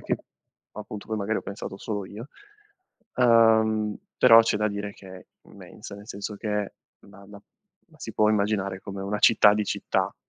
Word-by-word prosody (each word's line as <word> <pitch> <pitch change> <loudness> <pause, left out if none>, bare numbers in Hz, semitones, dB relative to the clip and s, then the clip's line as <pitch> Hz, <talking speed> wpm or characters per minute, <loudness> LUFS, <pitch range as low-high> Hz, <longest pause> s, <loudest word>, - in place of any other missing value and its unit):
che - - -2 0.6
appunto 105 0 -9
poi 110 - -2
magari 105 +1 -1
ho - - -8
pensato 100 -1 -7
solo 105 -3 -5
io, 115 +8 -10 0.9
uhm, 110 -3 +4 0.2
però 115 0 +8
c'è 110 -2 0
da 105 0 0
dire 100 0 -5
che 95 -1 -13
è 90 - -15 0.2
immensa, - - -12
nel 105 +1 -14
senso 100 0 -6
che 105 -1 -3 0.3
la 100 0 -17
la 100 -1 -13 0.5
la - - -22
si - - -7
può 105 0 +2
immaginare 100 -2 -1
come 95 -1 -7
una 105 +2 -3
città 105 -1 +6
di 105 0 -1
città, - - -2
105 Hz, 175 wpm, -25 LUFS, 100-110 Hz, 0.9 s, però